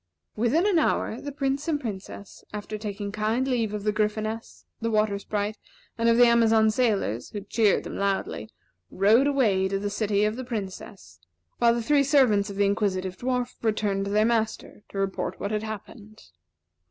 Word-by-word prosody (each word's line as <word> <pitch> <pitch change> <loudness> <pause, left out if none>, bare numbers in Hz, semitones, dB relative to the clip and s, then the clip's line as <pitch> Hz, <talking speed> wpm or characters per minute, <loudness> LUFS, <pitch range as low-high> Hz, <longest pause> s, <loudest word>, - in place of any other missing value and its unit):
Within 240 - +2
an 395 -5 +3
hour, 245 -6 0
the 285 - -5
Prince 275 +1 -2
and 305 -3 +1
Princess, 200 -4 -8
after 210 +1 -6
taking 205 -1 -5
kind 220 +5 0
leave 235 -5 0
of 210 -1 -4
the 210 - +2
Gryphoness, 215 +1 -3 0.2
and 230 0 -1
Water 215 -2 +1
Sprite, 210 +1 -3 0.4
and 230 0 +2
of 230 - +4
the 245 - +8
Amazon 225 -2 +4
sailors, 210 - 0
who 205 - -6
cheered 210 +1 +2
them - - -6
loudly, 195 - -2 0.4
rode 220 +8 +4
away 215 -10 +2
to 195 +1 -1
the 205 +1 -3
city 205 -1 +1
of 215 +2 -1
the 260 - -4
Princess; 195 - -7 0.4
while 235 0 +4
the 235 - -2
three 285 +3 +3
servants 250 -8 +3
of 200 - -7
the 200 0 +2
Inquisitive 190 -2 0
Dwarf 250 +3 -2
returned 210 -3 0
to 200 - -3
their 210 +1 +3
master 225 -2 -1
to - - -8
report 195 -1 -2
what 200 - -3
had 210 -1 -1
happened. 215 - -9
215 Hz, 180 wpm, -26 LUFS, 200-235 Hz, 0.4 s, the